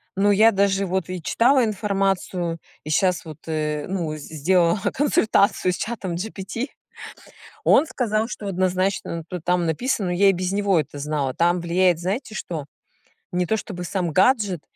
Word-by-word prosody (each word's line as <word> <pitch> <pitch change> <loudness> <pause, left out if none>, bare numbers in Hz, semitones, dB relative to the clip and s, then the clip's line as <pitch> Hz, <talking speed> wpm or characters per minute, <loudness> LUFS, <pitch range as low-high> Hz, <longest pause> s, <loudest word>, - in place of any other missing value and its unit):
но 205 +1 +3
я 220 +3 +6
даже 195 0 +1
вот 185 -1 -2
и 185 -2 -4
читала 250 - +3
информацию, 195 -4 -1 0.3
и 155 - -7
сейчас 180 +3 +2
вот, 155 -3 -9
э, 150 -2 -2
ну, 170 -5 -3
з - - -10
сделала 170 +4 +3 0.2
консультацию 215 -9 +2
с - - -3
чатом 205 -6 -4
GPT. 210 +6 -4 1.0
Он 310 - +5
сказал, 225 -5 -1
что 210 - -7
однозначно 185 -2 -1 0.2
там 180 -1 +1
написано, 190 - -1
ну, - - 0
я 195 +2 +4
и - - +6
без 185 +1 -2
него 200 -3 +2
это 145 -1 -4
знала, 145 -2 -2
там 175 +1 +2
влияет, 175 0 +2
знаете 210 +6 -3
что? 160 -8 -5 0.7
Не 180 0 0
то 220 - +1
чтобы 180 -5 -6
сам 180 -3 -2
гаджет, 195 - +2
185 Hz, 165 wpm, -23 LUFS, 170-205 Hz, 1.0 s, я